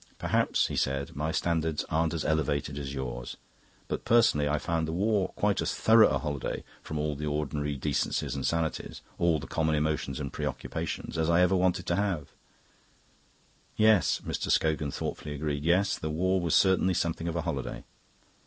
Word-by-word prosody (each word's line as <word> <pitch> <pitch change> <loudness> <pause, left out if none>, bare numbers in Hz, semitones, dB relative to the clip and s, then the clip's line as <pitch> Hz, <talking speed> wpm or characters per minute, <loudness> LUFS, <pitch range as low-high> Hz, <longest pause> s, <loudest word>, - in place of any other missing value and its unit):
"Perhaps," - - +1
he - - -3
said, 70 +1 -1
"my 75 +3 -1
standards 80 -2 0
aren't 80 +1 0
as 80 - -3
elevated 75 -2 0
as 70 -1 -5
yours. - - -5 0.5
But - - -3
personally 110 -11 +4
I 75 - +1
found 80 +1 -1
the - - -2
war 100 +2 +1
quite - - +1
as - - -1
thorough 110 -1 +6
a - - +1
holiday 75 -3 -3 0.2
from 75 - -5
all 75 0 -1
the 75 +2 -4
ordinary 75 -1 -2
decencies 65 - -1
and - - -4
sanities, 85 -1 -2 0.2
all 85 -2 +3
the 70 - -7
common 80 -1 0
emotions 75 -2 -1
and 70 -2 -5
preoccupations, - - -4
as 80 0 +1
I 85 +1 +4
ever 90 +1 +4
want 90 -1 +3
to 85 - -2
have." 100 -6 -1 1.5
"Yes," 110 - +4
Mr. - - -3
Scogan 75 -2 +2
thoughtfully 75 +1 -4
agreed. 75 -1 -2
"Yes, 90 +4 +2
the 80 - -3
war 95 +4 +1
was 85 -3 +1
certainly 95 -1 +4
something 85 0 -1
of 85 - -2
a 85 - 0
holiday. 75 -7 -4
80 Hz, 175 wpm, -29 LUFS, 75-85 Hz, 1.5 s, thorough